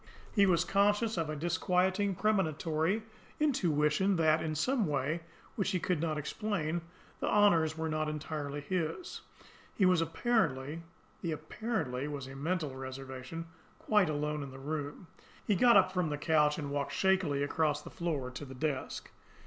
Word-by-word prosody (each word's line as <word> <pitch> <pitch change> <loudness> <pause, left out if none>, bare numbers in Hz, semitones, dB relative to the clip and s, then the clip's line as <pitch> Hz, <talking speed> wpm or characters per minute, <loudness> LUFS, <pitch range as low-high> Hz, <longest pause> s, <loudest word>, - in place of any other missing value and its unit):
He 200 -2 +5
was 170 -2 +3
conscious 205 +3 +2
of 165 -3 -1
a 155 - -2
disquieting, 185 +4 +1
premonitory 180 -1 +1 0.4
intuition 185 - +2
that, 160 -1 +3
in 155 -1 -2
some 235 - +1
way 150 +3 -1 0.3
which 200 -2 0
he 185 -2 0
could 175 -2 0
not 160 -2 0
explain, 170 0 -2 0.4
the - - -1
honours 165 -7 +4
were 160 0 -1
not 155 -1 -1
entirely 150 -1 -4
his. 175 - -3 0.5
He 195 - +3
was 180 -2 +4
apparently 165 - 0 0.4
the 165 -2 -1
"apparently" 150 - -3
was 145 -3 -5
a 135 +1 -9
mental 155 -1 -2
reservation 130 +4 -6 0.3
quite 210 -6 +3
alone 150 0 -1
in 140 - -6
the 135 - -10
room. 145 +4 -4 0.4
He 210 - +3
got 235 +4 +6
up 185 -1 +5
from 180 -4 0
the 145 - -2
couch 150 -1 +3
and 145 -3 -4
walked 140 0 -2
shakily 185 -7 +2
across 150 0 0
the - - -10
floor 150 -7 -2
to 125 +3 -7
the 135 -2 -9
desk. 140 -1 -3
160 Hz, 160 wpm, -32 LUFS, 145-190 Hz, 0.5 s, got